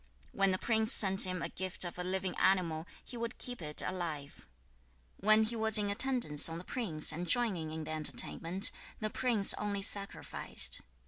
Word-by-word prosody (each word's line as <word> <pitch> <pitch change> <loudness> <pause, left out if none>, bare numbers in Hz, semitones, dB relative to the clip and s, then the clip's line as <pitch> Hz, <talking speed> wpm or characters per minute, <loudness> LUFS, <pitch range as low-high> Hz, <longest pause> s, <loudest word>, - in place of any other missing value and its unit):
When 195 0 0
the 185 - -1
prince 220 +2 +1
sent 195 -4 +8
him 180 -2 -4
a 170 - -4
gift 185 0 -4
of 175 0 -7
a - - -3
living 185 0 -4
animal, 170 -4 -1 0.2
he 245 - -11
would 235 +1 -6
keep 245 -5 -7
it 150 -1 -3
alive. 165 -6 -7 0.7
2. 200 - -9
When 215 0 +4
he 225 +2 -4
was 220 -1 +3
in 205 -1 -1
attendance 200 - +3
on 165 - -7
the 170 - -10
prince 180 -10 -1
and 175 +3 -7
joining 200 -10 -1
in 160 0 -7
the 155 - -9
entertainment, 155 - -1 0.3
the 215 -1 -4
prince 230 -6 +4
only 205 -1 -4
sacrificed. 195 - -1
190 Hz, 185 wpm, -31 LUFS, 165-215 Hz, 0.7 s, sent